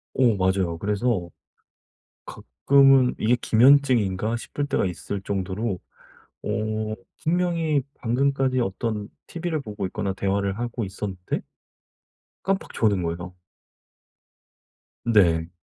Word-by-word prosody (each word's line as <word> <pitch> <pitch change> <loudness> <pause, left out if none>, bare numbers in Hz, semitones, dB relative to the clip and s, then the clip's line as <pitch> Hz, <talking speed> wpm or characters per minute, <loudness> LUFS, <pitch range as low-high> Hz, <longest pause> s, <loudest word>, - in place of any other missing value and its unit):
어 120 -5 +4
맞아요. 95 -3 +1
그래서 105 -2 0 1.0
가끔은 135 -2 +3
이게 120 +3 +3
기면증인가 120 -4 +3
싶을 145 +4 -4
때가 140 - 0
있을 90 +3 -4
정도로 95 0 -2 0.6
어 110 0 -2 0.3
분명히 165 -4 +1
방금까지 130 +2 +1
어떤 105 -1 -2 0.2
TV를 170 -2 -3
보고 105 -6 -5
있거나 95 +1 -2
대화를 100 +1 -1
하고 120 -1 -3
있었는데 95 -1 -4 1.0
깜빡 195 +1 -1
조는 100 -5 +1
거예요. 90 +2 -4 1.7
네. 85 -8 +3
110 Hz, 235 characters per minute, -24 LUFS, 95-130 Hz, 1.7 s, 어